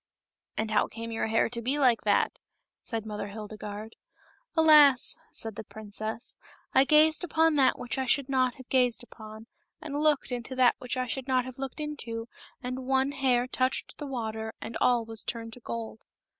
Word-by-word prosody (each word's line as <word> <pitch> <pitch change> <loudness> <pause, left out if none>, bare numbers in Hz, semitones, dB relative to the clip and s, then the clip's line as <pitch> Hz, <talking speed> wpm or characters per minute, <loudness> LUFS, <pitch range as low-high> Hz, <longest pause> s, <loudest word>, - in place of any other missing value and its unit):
"And 220 0 -1
how 215 - +3
came 230 0 -7
your 225 - -1
hair 225 +1 +2
to 235 0 -5
be 260 +5 0
like 250 -5 +4
that?" - - +2 0.4
said 225 -2 -4
Mother 210 -2 -5
Hildegarde. 210 +1 -8 0.4
" - - -35
Alas 300 -5 +6
!" - - -33
said 225 -2 -5
the - - -5
princess, 220 +2 -7 0.2
" - - -34
I 265 - +6
gazed 310 +3 +5
upon 325 -1 +3
that 265 -2 +4
which 245 +2 -3
I 260 - -1
should 275 +1 +2
not 255 -2 +1
have 260 -1 -13
gazed 250 -3 +2
upon, 220 -2 -11 0.3
and 300 -2 -4
looked 300 -4 +2
into 245 +1 -4
that 255 -1 +5
which 250 +1 -4
I 255 - 0
should 255 +2 -4
not 255 -1 +2
have 255 0 -9
looked 270 +2 -5
into, 240 -7 -4 0.4
and 255 +1 -5
one 265 +1 +2
hair 260 -3 +2
touched 255 0 -2
the 290 - -5
water 220 -4 -4
and 225 - -7
all 240 -2 +3
was 225 -1 -2
turned 230 -1 -5
to 245 - -9
gold." 230 -1 -6
250 Hz, 195 wpm, -28 LUFS, 225-270 Hz, 0.4 s, Alas